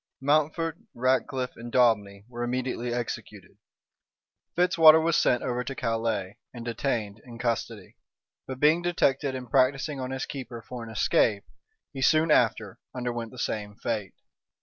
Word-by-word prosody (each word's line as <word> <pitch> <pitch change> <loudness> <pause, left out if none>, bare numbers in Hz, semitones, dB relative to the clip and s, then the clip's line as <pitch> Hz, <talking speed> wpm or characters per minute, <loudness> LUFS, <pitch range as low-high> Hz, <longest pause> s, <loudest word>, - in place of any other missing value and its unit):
Mountfort, 155 +3 +1 0.2
Ratcliff, 130 +1 0
and 120 0 -9
Daubeney 105 -5 +2
were 120 -1 -7
immediately 125 0 -2
executed: 120 -1 -6 1.0
Fitzwater 165 -3 +7
was 165 0 +1
sent 125 - +2
over 125 0 -1
to 135 +2 -6
Calais, 115 -5 -2
and 120 -2 -9
detained 115 -3 -2
in 120 -2 -11
custody; 115 -4 -3 0.5
but 130 -1 -6
being 155 +4 +4
detected 140 -6 +1
in 130 -1 -5
practising 135 +3 +1
on 130 -1 -4
his 135 0 -3
keeper 125 -5 -7
for 125 0 -7
an 115 - -9
escape, 105 -1 +2 0.5
he 135 - -6
soon 155 +4 +4
after 110 -7 +2 0.2
underwent 120 -2 -3
the 125 - -14
same 105 -3 -3
fate. 105 -4 -4
125 Hz, 145 wpm, -27 LUFS, 115-135 Hz, 1.0 s, Fitzwater